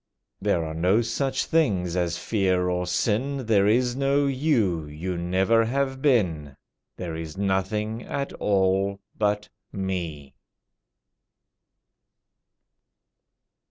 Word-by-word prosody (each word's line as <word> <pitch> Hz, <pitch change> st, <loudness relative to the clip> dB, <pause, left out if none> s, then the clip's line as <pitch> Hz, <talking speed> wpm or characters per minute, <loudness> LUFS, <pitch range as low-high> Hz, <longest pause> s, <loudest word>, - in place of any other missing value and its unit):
There 85 Hz, -2 st, +1 dB
are 80 Hz, -, -5 dB
no 90 Hz, +8 st, +2 dB
such 130 Hz, +4 st, -1 dB
things 95 Hz, -, +1 dB
as 85 Hz, -1 st, 0 dB
fear 95 Hz, -3 st, +1 dB
or 90 Hz, 0 st, -1 dB
sin, 125 Hz, +9 st, 0 dB
There 100 Hz, -3 st, +3 dB
is 120 Hz, +3 st, +2 dB
no 140 Hz, +1 st, +2 dB
you—you 95 Hz, -, 0 dB
never 95 Hz, +6 st, +2 dB
have 135 Hz, +2 st, -1 dB
been— 85 Hz, -, +1 dB, 0.4 s
There 85 Hz, -3 st, -5 dB
is 80 Hz, +1 st, -6 dB
nothing 100 Hz, +3 st, -1 dB
at 140 Hz, +2 st, -4 dB
all 100 Hz, 0 st, +1 dB, 0.2 s
but 105 Hz, -1 st, 0 dB, 0.2 s
Me." 85 Hz, -8 st, -4 dB
100 Hz, 100 wpm, -25 LUFS, 90-120 Hz, 0.4 s, There